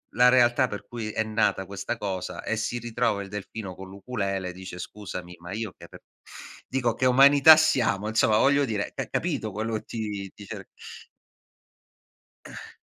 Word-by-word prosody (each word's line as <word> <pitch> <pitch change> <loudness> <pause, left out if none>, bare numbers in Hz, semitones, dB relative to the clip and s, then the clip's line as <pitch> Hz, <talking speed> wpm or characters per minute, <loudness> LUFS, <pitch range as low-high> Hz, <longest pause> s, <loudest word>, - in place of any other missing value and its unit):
la 125 +1 +6
realtà 125 0 +4
per 105 -1 -7
cui 115 -2 -5
è 110 - 0
nata 110 -3 0
questa 100 +4 -4
cosa, 95 -4 -4
e 115 - -2
si 120 +2 -2
ritrova 120 -3 -1
il 100 - -8
delfino 105 -1 -7
con 95 +1 -10
l'ukulele, 100 -2 -4
dice: 90 0 -9
"Scusami, 90 -3 -8
ma 85 +3 -8
io 110 -3 -4
che - - -12
r - - -13 0.7
dico 120 -3 0
che 130 - 0
umanità 140 +4 +8
siamo?". 120 -9 +2
Insomma 110 -1 +3
voglio 140 +3 +4
dire, 105 -4 -3
c - - -3
capito 110 - -2
quello 110 +3 -3
che 110 - -4 0.5
ti 105 - -12
cer - - -8 1.8
Eh. - - -11
110 Hz, 165 wpm, -26 LUFS, 100-120 Hz, 1.8 s, umanità